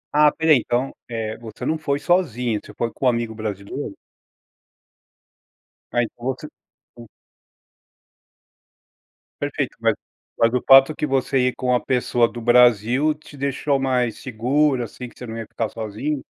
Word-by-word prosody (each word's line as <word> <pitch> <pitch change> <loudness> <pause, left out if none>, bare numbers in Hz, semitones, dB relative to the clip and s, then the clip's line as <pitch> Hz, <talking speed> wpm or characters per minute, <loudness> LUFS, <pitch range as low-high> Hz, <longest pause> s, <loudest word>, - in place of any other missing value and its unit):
Ah, 150 0 +6
espera 160 +2 +2
aí, 135 - +7
então, 125 +4 -2
eh, 110 -2 -3
você 110 -2 -8
não 160 - +1
foi 140 -3 -1
sozinho, 125 - 0
você - - -12
foi 115 -1 -1
com 130 - -1
um - - +7
amigo 115 -2 -1
brasileiro? 105 -2 -5 2.0
Aí, 120 -1 +3
então, 120 - -13
você, 130 +4 -3 0.5
hum 120 - -10 2.4
Perfeito, - - -2
mas - - +2 0.4
mas 115 0 +3
o 125 - 0
fato 135 +3 +7
que - - -1
você 135 -1 0
ir - - -6
com 130 - -4
uma 125 -1 +3
pessoa 120 -2 +2
do 120 - -8
Brasil 120 +4 +4
te 150 -1 -15
deixou 140 +1 0
mais 125 -4 0
seguro, 130 +2 +1
assim, 125 +2 -8
que - - -18
você 125 - -8
não 115 +1 -6
ia 115 - -5
ficar 115 -2 -3
sozinho? 115 +7 -4
125 Hz, 160 wpm, -22 LUFS, 115-140 Hz, 2.4 s, aí